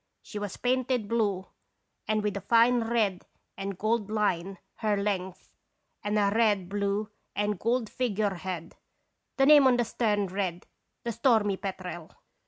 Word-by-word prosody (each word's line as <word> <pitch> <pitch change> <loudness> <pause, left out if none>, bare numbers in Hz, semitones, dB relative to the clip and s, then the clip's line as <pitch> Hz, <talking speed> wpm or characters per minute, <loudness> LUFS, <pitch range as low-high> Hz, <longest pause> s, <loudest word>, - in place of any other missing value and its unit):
She 210 - -7
was 205 -2 -5
painted 250 -3 0
blue, 205 -4 0 0.6
with 210 -2 0
a 200 - -3
fine 235 +3 +4
red 215 -5 0 0.3
and 195 -1 -5
gold 215 0 0
line 195 -3 0 0.2
her 210 -2 +1
length, 190 -2 -3 0.5
and 210 +1 0
a 200 -1 +3
red, 210 -5 +2
blue 205 +1 -1 0.2
and 205 -2 0
gold 235 0 0
figure 210 -4 -1
head. 175 -2 -6 0.6
The 270 - +5
name 290 -2 +8
on 250 -2 +4
the 240 - +1
stern 210 -3 0
read 185 -2 -3 0.4
The 235 - -2
Stormy 220 -3 +2
Petrel. 185 -4 -6
205 Hz, 145 wpm, -28 LUFS, 195-230 Hz, 0.6 s, name